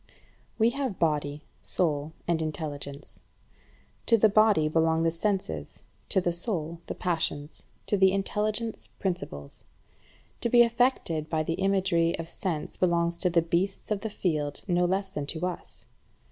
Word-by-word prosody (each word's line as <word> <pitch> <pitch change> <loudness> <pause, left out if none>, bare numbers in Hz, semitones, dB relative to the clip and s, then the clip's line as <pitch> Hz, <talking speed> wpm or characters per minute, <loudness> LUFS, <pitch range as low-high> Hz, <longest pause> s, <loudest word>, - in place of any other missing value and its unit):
16. - - -26 0.4
We 225 +1 +5
have 260 -7 -2
body, 150 -2 0 0.2
soul, 150 -3 0 0.2
and 170 -2 +2
intelligence. 145 -2 -5 0.9
To 230 - +7
the 220 0 +5
body 210 -6 +5
belong 160 +1 +2
the 165 - +3
senses, 170 - -2 0.3
to - - +4
the 175 -2 0
soul 170 -3 -3
the - - -4
passions, 160 -4 -2 0.2
to 205 - +1
the 190 0 +6
intelligence 210 +3 -1
principles. 125 - -4 0.7
To 235 - 0
be 240 0 +8
affected 230 -10 +1
by 160 -1 +1
the 165 - -1
imagery 190 -4 +2
of 165 - -5
sense 165 -3 -3
belongs 170 -1 +2
to 180 - +1
the 170 -1 +3
beasts 180 +5 -1
of 205 -2 0
the 220 - -2
field 155 -8 -1
no 175 -1 +3
less 190 +2 0
than 145 -6 -4
to 160 +3 -2
us. 180 -1 -4
170 Hz, 155 wpm, -28 LUFS, 155-195 Hz, 0.9 s, be